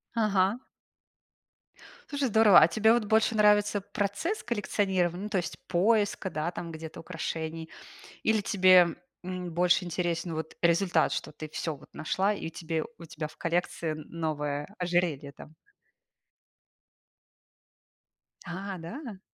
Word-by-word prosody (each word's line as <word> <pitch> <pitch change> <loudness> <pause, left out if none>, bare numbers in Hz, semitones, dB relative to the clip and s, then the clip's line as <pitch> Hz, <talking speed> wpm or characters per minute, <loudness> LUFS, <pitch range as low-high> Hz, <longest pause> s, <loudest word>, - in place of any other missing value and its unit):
Ага. 205 0 +2 1.5
Слушай, 280 -3 -1
здорово! 215 -4 +7
А - - +7
тебе 220 +6 +4
вот 240 -2 +2
больше 220 +1 +2
нравится 210 -1 +4
процесс 205 - -2
коллекционирования, 190 -5 -1
ну, 210 - -4
то 205 - 0
есть, 175 -2 -3
поиска, 205 +2 +2
да, 155 0 -2
там 170 -1 -6
где-то 160 0 -8
украшений? 160 -1 -5 0.5
Или 220 -2 +2
тебе, 185 -3 +5 0.3
м, 180 -1 -5
больше 180 +1 +3
интересен 170 -1 -2
вот 160 0 -5
результат, 170 -1 +3
что - - -4
ты 155 +1 -8
всё 155 0 -4
вот - - -17
нашла 190 +6 0
и - - -6
у - - -7
тебе 160 0 -3
у 170 - -10
тебя 155 0 -5
в 155 - -15
коллекции 170 -1 -1
н 155 -1 -7
новое 150 -2 -3
ожерелье 175 -6 0
там? 150 +3 -14 2.9
А, 190 +2 -5
да? 205 - -8
180 Hz, 135 wpm, -28 LUFS, 165-205 Hz, 2.9 s, здорово